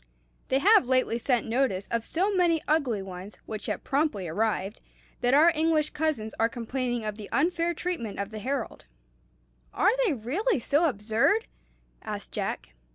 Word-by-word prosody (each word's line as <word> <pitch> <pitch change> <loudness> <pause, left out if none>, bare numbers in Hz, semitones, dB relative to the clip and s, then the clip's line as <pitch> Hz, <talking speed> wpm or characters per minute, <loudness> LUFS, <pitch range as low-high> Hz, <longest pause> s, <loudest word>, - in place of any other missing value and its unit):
They 265 - +2
have 395 - +5
lately 255 -2 +2
sent 245 -2 +1
notice 225 -5 0
of 230 -1 -1
so 385 +5 0
many 345 -3 +3
ugly 265 -10 +1
ones, 190 +2 -9
which 215 -1 -6
have - - -3
promptly 275 - 0
arrived, 205 +3 -1 0.4
that 245 +2 +3
our 320 +4 +7
English 310 -1 +1
cousins 295 -9 -2
are 225 - +3
complaining 240 0 -3
of 210 -1 -3
the 210 - -9
unfair 340 +2 +1
treatment 305 - -4
of 200 +1 -4
the 215 - -6
Herald." 260 +2 -4 0.9
"Are 400 +6 +3
they 405 -10 +2
really 310 - 0
so 295 +7 +2
absurd?" 230 - +1 0.6
asked 210 -2 -6
Jack. - - -4
255 Hz, 160 wpm, -27 LUFS, 215-320 Hz, 0.9 s, our